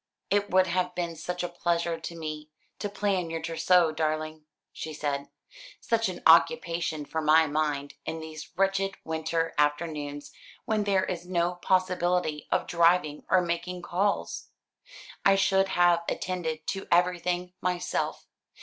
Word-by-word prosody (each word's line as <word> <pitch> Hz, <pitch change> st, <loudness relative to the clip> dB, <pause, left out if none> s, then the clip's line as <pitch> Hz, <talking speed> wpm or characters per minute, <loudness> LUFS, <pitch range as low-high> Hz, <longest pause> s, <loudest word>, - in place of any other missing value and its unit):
"It 205 Hz, 0 st, +2 dB
would 185 Hz, 0 st, +4 dB
have 180 Hz, 0 st, -1 dB
been 170 Hz, -2 st, -2 dB
such 180 Hz, +3 st, -4 dB
a -, -, 0 dB
pleasure 170 Hz, -1 st, -1 dB
to 170 Hz, +1 st, -7 dB
me 155 Hz, -2 st, -6 dB, 0.3 s
to 205 Hz, -, -3 dB
plan 195 Hz, -4 st, -1 dB
your 165 Hz, 0 st, -3 dB
trousseau, 165 Hz, +1 st, +3 dB
darling," 155 Hz, 0 st, -2 dB, 0.3 s
she 155 Hz, -1 st, -6 dB
said; 145 Hz, -2 st, -3 dB, 0.5 s
"such 225 Hz, -3 st, 0 dB
an 180 Hz, -, -7 dB
occupation 165 Hz, -3 st, +3 dB
for 160 Hz, +2 st, -3 dB
my 155 Hz, +1 st, +5 dB
mind 145 Hz, -2 st, -1 dB
in 160 Hz, 0 st, -4 dB
these 155 Hz, -1 st, -8 dB
wretched 195 Hz, 0 st, +1 dB
winter 160 Hz, +1 st, -1 dB
afternoons 145 Hz, -1 st, -1 dB, 0.3 s
when 220 Hz, -3 st, 0 dB
there 195 Hz, -2 st, +2 dB
is 180 Hz, -1 st, -5 dB
no 175 Hz, -1 st, +1 dB
possibility 180 Hz, -3 st, 0 dB
of -, -, +1 dB
driving 170 Hz, -3 st, +2 dB
or 185 Hz, -1 st, +4 dB
making 175 Hz, +1 st, -3 dB
calls. 195 Hz, +4 st, -1 dB, 0.8 s
I 195 Hz, -, +6 dB
should 195 Hz, 0 st, +3 dB
have 175 Hz, -2 st, +3 dB
attended 160 Hz, -4 st, -3 dB
to 195 Hz, -, -4 dB
everything 180 Hz, 0 st, +1 dB
myself. 180 Hz, -1 st, -2 dB
170 Hz, 140 wpm, -28 LUFS, 160-185 Hz, 0.8 s, I